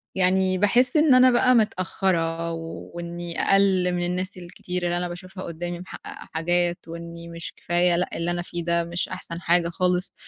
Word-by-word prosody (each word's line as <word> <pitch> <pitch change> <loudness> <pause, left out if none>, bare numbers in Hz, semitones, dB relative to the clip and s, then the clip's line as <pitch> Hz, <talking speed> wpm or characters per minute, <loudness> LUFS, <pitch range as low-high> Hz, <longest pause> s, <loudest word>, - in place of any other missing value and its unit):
يعني 185 0 +2
باحس 245 - +4
إن 300 -3 +5
أنا 255 0 +7
بقى 255 +1 +4
متأخّرة 175 -5 0
وإني 170 +1 -6
أقل 190 -2 +3
من 175 0 -1
الناس 185 +2 -2
الكتير 180 0 -6
اللي 175 0 0
أنا 175 0 -1
باشوفها 185 +2 -8
قدّامي 175 +1 -5
محققة 185 - -10
حاجات، 175 +1 0
وإني 170 0 -8
مش 170 0 -7
كفاية 175 0 +1
لأ 180 - 0
اللي 170 +1 -1
أنا 175 0 -2
فيه 175 -1 -5
ده 170 0 +1
مش 170 +1 -2
أحسن 170 +1 -6
حاجة 170 0 +2
خالص، 180 +1 0
175 Hz, 170 wpm, -24 LUFS, 170-185 Hz, -, أنا